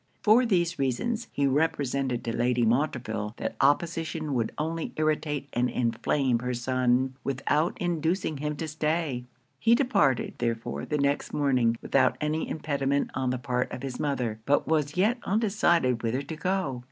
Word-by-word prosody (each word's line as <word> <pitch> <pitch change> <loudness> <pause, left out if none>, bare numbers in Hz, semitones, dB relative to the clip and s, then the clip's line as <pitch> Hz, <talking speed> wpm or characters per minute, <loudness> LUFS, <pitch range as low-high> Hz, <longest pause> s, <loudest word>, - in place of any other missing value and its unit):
For 230 +4 +5
these 175 -5 +1
reasons, 215 - -1
he 140 - 0
represented 135 -3 0
to 115 - -3
Lady 120 0 +2
Montreville 115 -4 -1
that - - -3
opposition 160 +1 +1
would 115 -3 0
only 160 +1 -3
irritate 155 -2 -1
and 125 +1 +1
inflame 120 +2 0
her 125 +1 -2
son, 130 +1 +1
without 145 +5 0
inducing 170 -1 -1
him 150 +1 -3
to 160 +2 -4
stay. 150 -4 -1 0.3
He 230 +1 +5
departed, 205 - +2
therefore, 115 - -2
the 150 - -1
next 140 0 0
morning, 125 -5 +2
without 130 -1 +2
any 155 +1 -1
impediment 140 -2 -1
on 130 -1 -1
the 125 - 0
part 125 0 -2
of 130 - -6
his 130 -2 -5
mother; 125 -7 -1
but 145 +1 +2
was 150 0 0
yet 220 +6 +2
undecided 175 - +2
whither 120 +4 -1
to 150 +3 -6
go. 160 -6 -1
140 Hz, 155 wpm, -27 LUFS, 125-160 Hz, 0.3 s, For